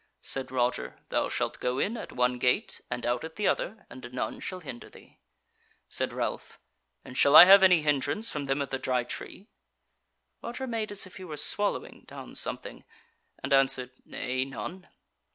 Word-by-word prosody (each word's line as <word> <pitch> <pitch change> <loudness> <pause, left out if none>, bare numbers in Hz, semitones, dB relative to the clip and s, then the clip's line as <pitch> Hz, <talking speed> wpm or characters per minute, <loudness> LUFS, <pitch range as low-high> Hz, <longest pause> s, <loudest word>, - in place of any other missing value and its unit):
Said 135 -1 0
Roger: 125 -1 -1
"Thou - - 0
shalt - - -2
go 125 +1 -1
in 210 - 0
at 230 - -7
one 125 0 0
gate 125 0 0
and 125 0 -4
out 120 0 0
at 160 0 -8
the 210 - 0
other, 215 +2 -2
and 125 -1 -10
none 125 - -4
shall 185 -1 -6
hinder 130 -7 -9
thee." - - -18 0.7
Said - - -1
Ralph: - - -4 0.5
"And 125 - -10
shall 140 +3 +5
I - - +13
have 195 +1 +9
any 180 -4 +5
hindrance 150 +9 0
from 145 -7 -4
them 135 +1 0
of 135 - -9
the 135 - -2
Dry 130 -2 0
Tree?" 185 +9 -8 1.0
Roger 240 +3 -5
made 225 -4 -3
as 205 -1 +1
if 185 - -13
he 190 - -9
were 155 -4 -7
swallowing 205 +7 0
down - - -10
something, - - -4 0.6
and 135 +1 0
answered: 135 -2 +3
"Nay, 130 0 -2
none." 170 +7 -7
140 Hz, 180 wpm, -28 LUFS, 125-190 Hz, 1.0 s, I